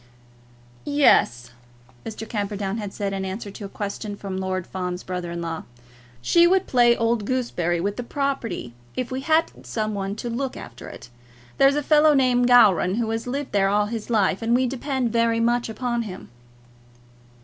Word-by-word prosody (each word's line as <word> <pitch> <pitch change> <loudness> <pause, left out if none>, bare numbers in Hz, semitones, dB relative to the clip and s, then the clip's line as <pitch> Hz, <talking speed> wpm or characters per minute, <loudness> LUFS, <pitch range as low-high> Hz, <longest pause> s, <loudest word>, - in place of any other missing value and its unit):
"Yes," 195 - +3 0.6
Mr. 225 0 -6
Camperdown 205 -1 -3
had 205 -2 -5
said 200 -1 -3
in 195 0 -3
answer 195 +2 -5
to 200 +1 -8
a - - -7
question 205 +1 -5
from 195 -2 -5
Lord 185 -1 -2
Fawn's 180 -1 -4
brother 180 -1 -4
in 170 0 -4
law; 165 -1 -4 0.6
"she 340 - +5
would 380 +1 +3
play 240 -2 +4
old 230 -1 +1
gooseberry 200 -8 -1
with 200 +4 -2
the 245 - -3
property 240 - -3 0.2
if 255 -1 -3
we 260 +1 -3
hadn't 320 +3 0
some 215 -1 -2
one 195 0 -3
to 230 - -6
look 250 +3 -3
after 120 - -10
it. - - -11 0.5
There's 275 +1 +5
a 295 - 0
fellow 300 +1 +5
named 250 -2 +3
Gowran 210 -7 +5
who 225 -1 -1
has 225 +2 -3
lived 275 +2 -3
there 195 -1 +2
all 205 +1 +2
his 220 +1 -5
life, 205 -4 +2
and 230 +1 +2
we 255 +1 +3
depend 260 -1 -2
very 230 0 +2
much 240 +1 +1
upon 240 +1 -2
him." 190 -5 -8
225 Hz, 180 wpm, -23 LUFS, 195-250 Hz, 0.6 s, she